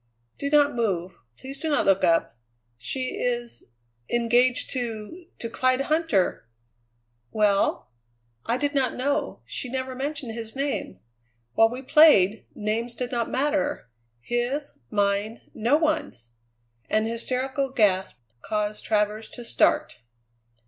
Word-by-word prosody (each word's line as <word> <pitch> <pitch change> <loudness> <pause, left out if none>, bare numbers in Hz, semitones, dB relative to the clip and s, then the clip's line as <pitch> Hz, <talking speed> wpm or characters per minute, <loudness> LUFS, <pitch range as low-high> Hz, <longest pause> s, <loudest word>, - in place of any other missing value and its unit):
"Do 280 - -2
not 290 -1 +4
move. 190 -7 -2 0.2
Please 270 +1 -9
do 320 - -2
not 290 - +2
look 195 -1 +3
up. 165 -8 +2 0.4
She 255 - -3
is 240 -1 -2 0.4
engaged 240 +1 +2
to 245 - -5
to 230 - -5
Clyde 255 +3 +1
Huntter!" 285 - +1 0.8
"Well?" 200 - +1 0.5
"I 235 - 0
did 290 +2 -1
not 265 -3 +1
know; 280 +3 -1
she 255 - -4
never 260 +1 -3
mentioned 275 -1 -4
his 225 0 -6
name. 270 - -2 0.5
While 225 0 +5
we 250 +3 -7
played, 255 - +5
names 225 +2 -2
did 250 0 -4
not 235 -2 -1
matter 290 - -1 0.3
his, 245 - -2 0.2
mine, 205 +2 0
no 240 +7 +2
one's." 305 - -1 0.6
An 215 0 +2
hysterical 255 +4 -2
gasp 195 - +1 0.2
caused 210 0 -2
Travers 210 0 0
to 240 - -10
start. 115 - +1
240 Hz, 125 wpm, -25 LUFS, 215-275 Hz, 0.8 s, While